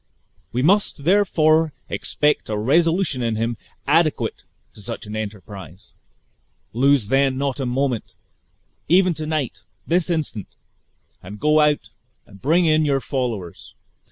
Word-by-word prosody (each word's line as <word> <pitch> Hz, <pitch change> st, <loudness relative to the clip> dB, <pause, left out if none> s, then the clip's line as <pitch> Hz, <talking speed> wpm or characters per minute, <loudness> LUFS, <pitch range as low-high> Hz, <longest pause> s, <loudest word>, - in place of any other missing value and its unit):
We 125 Hz, +2 st, -1 dB
must 190 Hz, -3 st, +2 dB
therefore 160 Hz, -4 st, +3 dB
expect 150 Hz, -5 st, 0 dB
a 105 Hz, -, -1 dB
resolution 165 Hz, -, +2 dB
in 115 Hz, -2 st, 0 dB
him 115 Hz, +2 st, -1 dB, 0.3 s
adequate 155 Hz, +1 st, +1 dB, 0.3 s
to -, -, -12 dB
such 100 Hz, -, -6 dB
an 105 Hz, +1 st, -7 dB
enterprise. 100 Hz, -4 st, -8 dB, 0.8 s
Lose 135 Hz, 0 st, +3 dB
not 135 Hz, +1 st, +1 dB
then -, -, -3 dB
a 125 Hz, -, -2 dB
moment; 130 Hz, -3 st, -2 dB, 0.7 s
even 180 Hz, +1 st, +4 dB
to 155 Hz, -1 st, -6 dB
night, 155 Hz, -6 st, -2 dB, 0.2 s
this 175 Hz, +1 st, +1 dB
instant, 150 Hz, -, -2 dB, 0.7 s
and 100 Hz, +3 st, -10 dB
go 150 Hz, +4 st, +3 dB
out 150 Hz, -1 st, +2 dB, 0.3 s
and 100 Hz, -2 st, -17 dB
bring 165 Hz, +7 st, +3 dB
in 155 Hz, -1 st, +3 dB
your 140 Hz, -2 st, +2 dB
followers! 120 Hz, -, -4 dB
140 Hz, 130 wpm, -21 LUFS, 115-155 Hz, 0.8 s, even